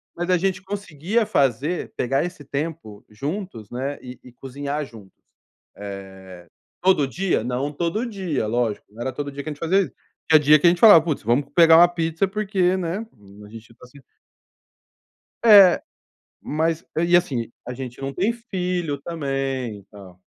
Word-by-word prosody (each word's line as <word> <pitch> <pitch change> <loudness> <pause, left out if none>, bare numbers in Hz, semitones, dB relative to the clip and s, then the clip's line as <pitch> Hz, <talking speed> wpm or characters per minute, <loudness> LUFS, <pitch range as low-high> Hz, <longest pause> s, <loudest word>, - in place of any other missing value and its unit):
mas 175 +1 -4
a 180 - +4
gente 185 +1 -1
conseguia 200 +1 -2
fazer 145 - 0
pegar 135 +4 0
esse 175 -4 -8
tempo 145 -7 -5
juntos, 140 - -6
né, 135 +3 -4
e 125 0 -10
e 125 - -14
cozinhar 140 +3 -5
juntos. 110 -6 -15 0.6
Eh, 95 -3 -10 0.4
todo 180 -6 +3
dia? 175 - -1
Não 125 +4 -2
todo 175 - -2
dia, 185 - -3
lógico, 115 -1 -1
não 115 - -11
era 130 +1 -3
todo 145 +1 -5
dia 140 +1 -6
que 155 - -5
a - - -4
gente 145 - -17
fazia 190 +4 +2
isso. - - -9 0.4
Tinha 155 - +7
dia 150 +1 +5
que 175 - +4
a - - +9
gente 175 - -2
falava: 205 -8 +9
"Puts, 155 -8 -3
vamos 120 +6 +1
pegar 165 -1 +7
uma 175 +1 +8
pizza, 165 +1 -1
porque, 195 -3 0
né", 185 +5 -4 0.4
a - - -14
gente 115 +1 -13
tá 125 - -16
se 140 +3 -17 1.5
É, 200 -5 +8 0.6
mas 160 +2 -1
e, 170 +2 +4
assim, 130 -11 -1 0.2
a 125 - -5
gente 125 -1 -8
não 135 0 -4
tem 200 +6 +1
filho 180 - -3
também 135 -8 -3
e - - -22
tal. 95 -3 -14
150 Hz, 175 wpm, -22 LUFS, 125-180 Hz, 1.5 s, a